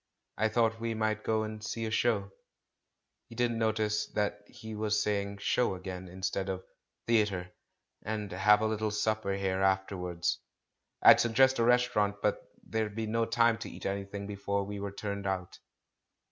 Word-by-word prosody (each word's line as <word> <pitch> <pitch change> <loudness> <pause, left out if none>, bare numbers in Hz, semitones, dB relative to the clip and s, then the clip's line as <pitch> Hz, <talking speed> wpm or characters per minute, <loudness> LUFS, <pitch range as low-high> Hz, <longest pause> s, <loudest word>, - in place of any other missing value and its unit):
I 110 - +2
thought 110 0 +1
we 115 0 -2
might 110 -1 -1
go 110 -1 +1
and 110 0 -6
see 115 +1 -3
a 110 - -3
show" 110 -3 +1 0.5
— - - -54
he 115 - -11
didn't 120 -1 0
notice 110 -1 +1
that 105 -1 -1
he 110 0 -9
was 105 0 0
saying 100 -1 -1
"show" 100 +1 +1
again, 95 0 -7
instead 95 +1 -3
of 95 -1 -3 0.4
"theatre" 105 -6 +1 0.3
— - - -54
"and 105 -1 -4
have 105 +3 +4
a - - +1
little 110 0 0
supper 105 -1 0
here 95 -1 -1
afterwards. 95 -2 0 0.6
I'd - - +9
suggest 130 +3 +4
a - - +4
restaurant, 120 -4 +3
but 105 0 0 0.2
there'd 110 -2 -2
be 110 0 -2
no 115 +1 +1
time 115 0 +3
to - - -6
eat - - -10
anything 100 +1 -3
before 100 0 -2
we 100 +1 -6
were 100 0 -4
turned 100 0 -4
out." 95 -2 -3
105 Hz, 175 wpm, -31 LUFS, 100-110 Hz, 0.6 s, I'd